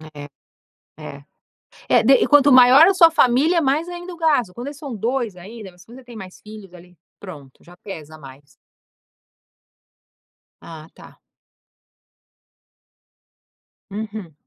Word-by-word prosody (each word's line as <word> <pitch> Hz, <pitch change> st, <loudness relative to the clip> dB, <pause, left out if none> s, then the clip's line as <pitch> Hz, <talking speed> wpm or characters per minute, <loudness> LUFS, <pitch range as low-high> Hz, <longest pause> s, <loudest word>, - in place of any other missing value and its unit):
É, 145 Hz, 0 st, -11 dB, 0.7 s
é, 140 Hz, -2 st, -11 dB, 0.7 s
é, -, -, +3 dB
de 260 Hz, +4 st, +4 dB
e -, -, 0 dB
quanto 290 Hz, -1 st, +4 dB
maior 255 Hz, +6 st, +6 dB
a 390 Hz, -, +2 dB
sua 335 Hz, -3 st, +4 dB
família, 310 Hz, +4 st, +1 dB
mais 295 Hz, +4 st, -1 dB
ainda 350 Hz, +1 st, -9 dB
o -, -, -14 dB
gasto 290 Hz, -, -1 dB
quando 240 Hz, +3 st, -8 dB
eles 285 Hz, 0 st, -9 dB
são 285 Hz, -5 st, -9 dB
2 230 Hz, -1 st, -4 dB
ainda 200 Hz, +2 st, -12 dB
Mas 180 Hz, 0 st, -21 dB
se -, -, -35 dB
você 260 Hz, +1 st, -14 dB
tem 240 Hz, -1 st, -15 dB
mais 190 Hz, -4 st, -12 dB
filhos, 210 Hz, -3 st, -14 dB
ali 180 Hz, 0 st, -18 dB, 0.2 s
pronto, 145 Hz, -9 st, -14 dB
já 175 Hz, -, -18 dB
pesa 155 Hz, -5 st, -12 dB
mais. 140 Hz, -1 st, -16 dB, 2.2 s
Ah, 160 Hz, -1 st, -13 dB
tá. -, -, -18 dB, 2.7 s
Uhum. 210 Hz, -4 st, -8 dB
220 Hz, 135 wpm, -19 LUFS, 180-280 Hz, 2.7 s, maior